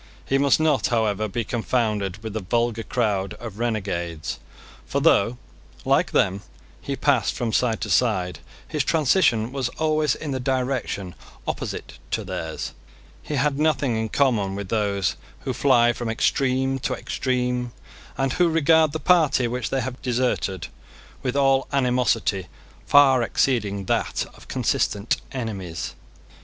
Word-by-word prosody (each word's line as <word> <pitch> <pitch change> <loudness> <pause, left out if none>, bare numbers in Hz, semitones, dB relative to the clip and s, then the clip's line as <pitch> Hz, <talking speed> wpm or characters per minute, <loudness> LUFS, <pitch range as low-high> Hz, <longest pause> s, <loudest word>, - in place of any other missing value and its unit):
He 135 - +1
must 140 +1 +4
not, 155 -3 +2
however, 110 -3 +1
be 115 +4 -2
confounded 110 -5 -1
with 110 -2 -5
the 110 - -2
vulgar 115 +3 0
crowd 105 -6 -1
of 110 -2 -9
renegades. 95 -8 -2 0.5
For - - 0
though, 115 +5 +3 0.5
like - - +3
them, 100 0 +1 0.4
he - - -3
passed - - +2
from 115 -3 -2
side 115 -3 +1
to - - -3
side, 90 -8 +1 0.3
his - - -1
transition 130 - +2
was 135 -3 -1
always 155 -1 +2
in 150 - -5
the 130 - -2
direction 125 -8 -2 0.3
opposite - - -5
to - - -1
theirs. - - -5 0.5
He 150 - -4
had 140 +1 +1
nothing 150 -5 +2
in 110 0 -1
common 110 -9 +1
with 100 -2 -5
those 100 -3 0 0.2
who - - -3
fly 120 0 +4
from 120 -1 -4
extreme 130 +3 +1
to - - -1
extreme, 125 -1 -1 0.5
and 135 -1 0
who 175 -1 +3
regard 160 -1 +4
the 160 - -2
party 155 -9 +3
which 125 0 -3
they 135 - 0
have 125 +1 -5
deserted 120 -8 -1 0.5
with 130 -1 -2
all 135 -1 +3
animosity 125 -8 +1 0.4
far 135 -3 +6
exceeding 105 -5 0
that - - 0
of - - -16
consistent 105 +2 0
enemies. 100 -10 -4
120 Hz, 145 wpm, -24 LUFS, 105-135 Hz, 0.5 s, far